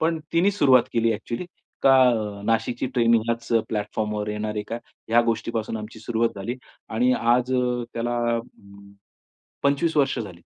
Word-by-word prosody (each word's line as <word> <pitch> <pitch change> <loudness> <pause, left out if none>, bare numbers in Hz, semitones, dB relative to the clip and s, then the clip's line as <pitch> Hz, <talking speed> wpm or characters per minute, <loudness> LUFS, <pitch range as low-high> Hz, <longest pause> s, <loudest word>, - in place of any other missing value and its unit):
पण 160 0 +1
तिनी 175 +4 +4
सुरुवात 135 - +5
केली 115 0 +2
अ‍ॅक्चुअली. 120 - -5 0.4
का 135 - +6 0.5
नाशिकची 115 +3 0
ट्रेनिंग 115 -2 +4
ह्याच 115 0 -2 0.2
प्लॅटफॉर्मवर 105 0 -2
येणार 105 0 -3
आहे 105 - -2
का? 115 - -3 0.3
ह्या 115 +1 +5
गोष्टीपासून 115 -1 -2
आमची 110 +1 -8
सुरुवात 115 +1 0
झाली 100 +5 -4 0.3
आणि 125 +3 +2
आज 125 +2 +2 0.4
त्याला 120 +1 -1 0.2
अ, 115 - -1 1.2
25 140 +3 +1
वर्ष 135 -3 +2
झाली. 105 -5 -6
115 Hz, 145 wpm, -24 LUFS, 110-125 Hz, 1.2 s, का